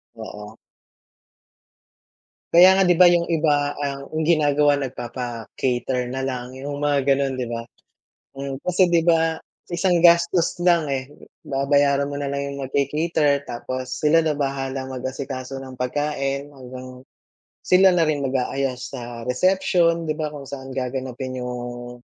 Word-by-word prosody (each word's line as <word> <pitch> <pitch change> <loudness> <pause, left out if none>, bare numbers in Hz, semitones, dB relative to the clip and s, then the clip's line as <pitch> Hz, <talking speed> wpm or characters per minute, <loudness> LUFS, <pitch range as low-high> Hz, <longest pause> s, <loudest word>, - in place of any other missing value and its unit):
Oo. 105 0 -9 2.0
Kaya 185 +3 +8
nga - - +5
'di 175 - +5
ba, 180 +1 +7
yung 170 -1 +2
iba 150 -3 +1
ang 140 -1 -4
yung 160 - 0
ginagawa 145 -3 +3
nagpapa-cater 125 0 -3
na 130 +2 -4
lang, 130 -1 -4
yung 140 +2 -5
mga 145 -2 +1
gano'n, 140 0 +1
'di 130 - -2
ba? 115 0 -3 0.7
Mm. 135 -1 -5
Kasi 180 +2 +2
'di 170 - +5
ba, 165 -1 +3 0.2
sa - - -20
isang 180 -1 +3
gastos 170 +1 +4
lang, 175 -2 +3
eh, 130 -1 -2 0.4
babayaran 140 0 +2
mo 140 - -4
nalang 140 0 -3
yung 140 - -7
nagca-cater 145 +1 0
tapos 130 +2 -5
sila 155 +2 +5
na 155 -2 0
bahala 135 -1 -2
mag-asikaso 130 +1 -5
ng 130 -1 -9
pagkain 140 +1 -2
hanggang 130 -1 -10 0.7
sila 190 +1 +6
na 170 -3 +2
rin 150 -2 0
mag-aayos 130 -1 -2
sa 120 -2 -7
reception, 170 +3 +2
'di 155 - -1
ba, 155 -1 -3
kung 145 -2 -9
saan 135 -1 -8
gaganapin 130 0 -4
yung, 120 0 -6
140 Hz, 140 wpm, -22 LUFS, 130-155 Hz, 2.0 s, Kaya